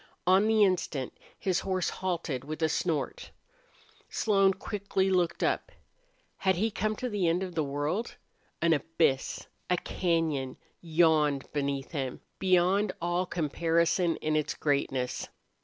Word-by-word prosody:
On 190 +4 +5
the 220 -1 +5
instant 170 -9 0 0.2
his 185 -2 0
horse 185 -2 -1
halted 170 -8 -3
with 155 +3 -5
a 160 - +3
snort. 155 -3 -2 0.8
Slone 195 -3 +3
quickly 195 -2 -1
looked 180 -2 +1
up. - - 0 0.7
Had 190 -1 +2
he 220 +6 0
come 215 +2 -1
to 250 - -3
the 205 -6 0
end 170 +3 +1
of 185 -2 -5
the 160 -2 0
world? 145 +10 -2 0.5
An 170 -1 +5
abyss, 145 -2 0 0.2
a 180 - +4
cañon, 160 -8 -1 0.2
yawned 155 -4 +2
beneath 140 -2 -2
him, 135 -5 -3 0.2
beyond 185 +2 +3
all 175 +1 0
comparison 170 +2 +1
in 155 0 -1
its 155 -1 0
greatness. 135 -3 -1
170 Hz, 135 wpm, -29 LUFS, 150-190 Hz, 0.8 s, On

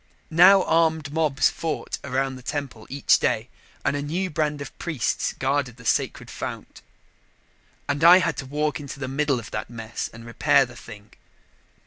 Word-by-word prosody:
Now 185 +4 +7
armed 160 -3 +1
mobs 155 -3 +2
fought 160 -2 -4
around 135 0 -1
the 130 - -10
temple 135 -5 -5
each 140 0 +3
day - - 0 0.4
and - - +1
a 145 - -2
new 175 +6 -2
band 150 -2 -1
of 145 - -8
priests 155 -9 -1
guarded 130 -2 -1
the 115 - -14
sacred - - -1
fount. - - -7 1.1
And 145 +2 -1
I 175 +2 +10
had 175 -3 +1
to 135 - -5
walk 150 +2 -1
into 140 -1 -8
the 130 - -4
middle 140 -1 0
of 115 - -10
that 105 - -4
mess 115 -1 -5
and 115 +1 -12
repair 130 +3 +3
the 120 0 -13
thing. 105 -2 -12
145 Hz, 170 wpm, -24 LUFS, 130-155 Hz, 1.1 s, I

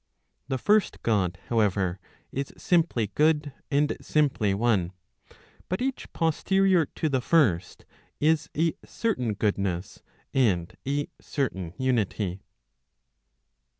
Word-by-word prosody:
The 135 -1 -1
first 210 - +2
God, 100 -6 +1
however, 100 -5 +1 0.3
is 140 +1 -3
simply 160 - +1
good, 150 -2 +2 0.2
and 145 +1 +2
simply 140 -9 +1
one. 100 -5 +1 0.8
But 185 - -1
each 265 +1 -3
posterior 180 +1 +2
to 160 - -2
the 135 -4 +1
first, 110 - +2 0.3
is 155 0 +2
a 160 +1 +2
certain 125 - -1
goodness, 100 -2 -1 0.3
and 95 -10 +1
a 145 +1 0
certain 95 - -3
unity. 105 -7 0
130 Hz, 105 wpm, -27 LUFS, 100-155 Hz, 0.8 s, first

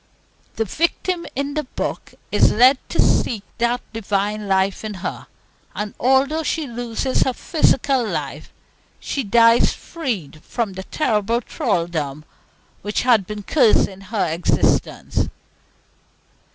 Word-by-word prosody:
The 225 - 0
victim 340 - -1
in 280 +2 -2
the 305 -1 -2
book - - -5 0.2
is - - +4
led 255 +4 +5
to - - -4
seek 220 -5 +2 0.2
that 240 +1 +1
Divine 210 -1 -1
Life 190 +1 +1
in 215 -1 -4
her, - - -5 0.5
and 210 0 -4
although 270 +5 +3
she 320 0 -1
loses 245 +1 -2
her 260 - +2
physical 270 -3 +2
life, 220 - -4 0.5
she 275 - -3
dies 230 +2 +5
freed 215 - -5
from 225 -5 -3
the 190 0 -7
terrible 230 -5 0
thraldom 170 - -2 0.6
which 205 0 -1
has 245 -3 +5
been 210 +2 -7
cursing 200 -7 +3
her 205 +1 -1
existence. 165 +1 0
230 Hz, 125 wpm, -21 LUFS, 200-265 Hz, 0.6 s, led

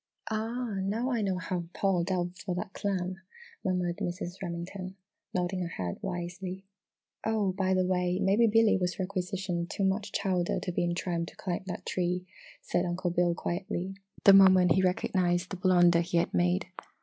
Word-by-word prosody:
"Ah! 225 0 -2
Now 225 +7 -1
I 235 -3 +1
know 190 -3 0
how 180 0 -3
Paul 190 -3 +2
delved 180 0 -2
for 180 -3 -3
that 185 +2 -4
clam!" 185 -2 -2 0.5
murmured 180 -2 0
Mrs. 175 0 -3
Remington, 185 +2 -5 0.4
nodding 180 +1 -1
her 175 - -1
head 90 - -4
wisely. 180 +2 -5 0.6
"Oh, 215 -3 +1
by 190 0 +1
the 185 0 +2
way! 180 -1 +1
maybe 200 +4 +4
Billy 225 -1 +4
has 180 0 -1
requisitioned 185 -2 -2
too 200 - -2
much 195 +2 0
chowder 185 -3 0
to 180 - -3
be 175 - 0
in 175 0 0
trim 170 -1 -2
to - - -12
climb 180 -2 -3
that 180 - -5
tree!" 180 0 -1 0.4
said - - 0
Uncle 175 0 -1
Bill 175 0 +2
quietly, 185 +1 -3 0.3
the 195 - +9
moment 190 -2 +7
he 190 - +4
recognised 180 -1 +1
the - - -2
blunder 175 -2 +5
he 175 0 -1
had 170 - +1
made. 90 0 +2
185 Hz, 175 wpm, -29 LUFS, 175-195 Hz, 0.6 s, the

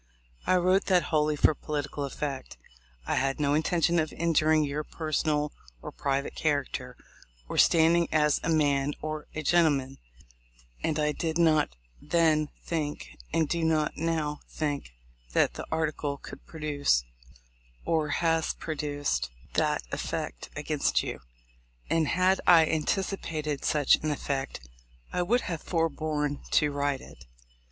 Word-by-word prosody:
I 185 - +4
wrote 185 +2 +3
that 180 -3 +3
wholly 150 0 +3
for 150 - +4
political 145 -1 -4
effect. 140 0 -5 0.5
I - - -1
had 135 +2 0
no 145 -1 +2
intention 170 +2 +2
of 155 -1 -1
injuring 155 -2 +3
your 145 +1 -2
personal 150 -1 -1 0.3
or - - -8
private 140 0 -2
character, 135 -4 -2 0.5
or - - -2
standing 170 +1 +5
as 150 -2 +3
a - - -2
man 145 -3 +2
or 155 -1 -4
a 155 - -3
gentle 170 +1 +5
man; 135 0 -4 0.8
and 155 - 0
I 150 -1 +2
did 160 +2 -2
not 155 - +3 0.3
then 155 -3 +2
think, 150 - -4 0.2
and 160 -2 +2
do 170 +2 -1
not 155 -2 +1
now 155 -2 -1
think, 145 - -3 0.4
that - - +3
that - - -7
article 155 -3 -1
could - - -12
produce, 145 - +1 0.8
or 155 -2 +1
has 165 0 +1
pro 160 - -4
duced, 145 - -2 0.2
that - - +1
effect - - -4
against - - 0
you; - - -5 0.7
and 165 -2 +2
had 185 +3 +2
I 165 -2 +8
antici 180 +5 -1
pated 150 -3 -3
such 150 -3 +4
an 155 - -3
effect, 135 - -3 0.5
I 180 - +1
would 235 +8 +2
have 165 -3 -4
forborne 155 -3 -1
to 150 -1 +4
write 140 -1 -1
it. 65 - -14
155 Hz, 145 wpm, -28 LUFS, 145-165 Hz, 0.8 s, I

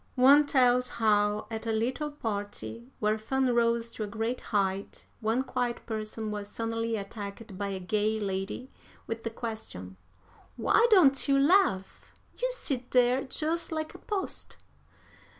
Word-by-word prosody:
"One 280 +3 +7
tells 250 -2 +3
how, 210 -1 +2
at 225 +1 -4
a - - +1
little 250 +7 -1
party, 225 -2 -5
where 215 +1 +1
fun 260 +3 +1
rose 235 0 +2
to 220 - -5
a - - -3
great 225 +4 -3
height, 195 -2 -2
one 225 +3 +1
quiet 245 -2 -2
person 215 -1 -4
was 205 -1 -4
suddenly 230 +1 -2
attacked 200 0 -7
by 200 +1 -3
a 195 -1 -3
gay 215 +4 0
lady 195 +5 -3 0.3
with 225 0 -4
the 230 - -2
question: 220 - -6 0.6
'Why 470 - +4
don't 305 - +6
you 275 -1 +4
laugh? 280 - +2 0.2
You - - -1
sit 270 - -2
there 250 +1 +4
just 320 +6 -1
like 315 -1 -3
a - - -11
post!' 405 -3 -4
230 Hz, 150 wpm, -29 LUFS, 210-260 Hz, 0.6 s, One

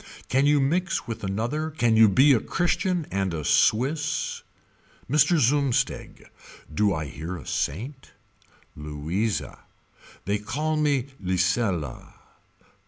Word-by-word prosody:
Can 135 +2 +3
you 145 0 +4
mix 170 +7 0
with 115 -1 -6
another 115 +11 -2
Can 120 -7 +1
you 110 -1 +7
be 135 +9 +5
a 120 - +3
Christian 175 - -1
and 95 -3 -1
a 75 -2 -5
Swiss. 145 +7 +1 0.7
Mr. 150 +5 +3
Zumsteg. 140 -1 0 0.5
Do 105 +5 +2
I 80 -4 -2
hear 80 +5 -6
a - - -11
saint. 125 - -4 0.7
Louisa. 75 +9 -3 0.7
They 100 +2 0
call 150 +9 -2
me 140 -3 +1
Lisela. 90 - -1
115 Hz, 115 wpm, -25 LUFS, 95-145 Hz, 0.7 s, you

